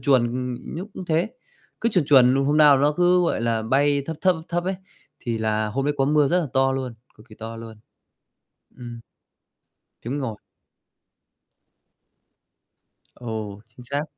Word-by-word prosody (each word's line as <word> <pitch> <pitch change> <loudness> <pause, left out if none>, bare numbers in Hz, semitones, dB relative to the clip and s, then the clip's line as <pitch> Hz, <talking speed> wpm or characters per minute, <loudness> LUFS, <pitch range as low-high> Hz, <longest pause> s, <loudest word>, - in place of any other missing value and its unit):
chuồn, 125 -2 +3
ừm, 125 0 -5
nhúc 180 +6 -5
cũng 190 - -6
thế. 170 +5 0 0.5
Cứ 230 - +2
chuồn 185 -8 +1
chuồn 130 -3 +6
luôn, 135 0 +1
hôm 145 +1 +2
nao 150 -3 +7
nó 145 +2 +3
cứ, 180 0 +4
gọi 170 - 0
là, 115 -1 0
bay 140 +5 +2
thấp 160 - -4
thấp, 185 -1 +4
thấp 160 - -10
thấp 175 0 -1
ấy, 190 +1 -1 0.5
thì 115 -2 -3
là 110 0 0
hôm 135 +6 -2
đấy 145 +1 0
có 135 - +3
mưa 145 0 +3
rất 180 +4 +2
là 165 - -2
to 135 0 +3
luôn, 130 -3 -4 0.2
cực 110 +4 -19
kỳ 110 - -13
to 115 +1 -8
luôn. 115 -1 -10 1.0
Ừm. 120 -2 -9 1.0
Chuẩn 125 +5 -3
ngồi. 125 -7 -4 2.8
Ồ, 110 -4 -6
chính 115 +2 -15
xác. 145 +1 -1
135 Hz, 175 wpm, -23 LUFS, 115-150 Hz, 2.8 s, nao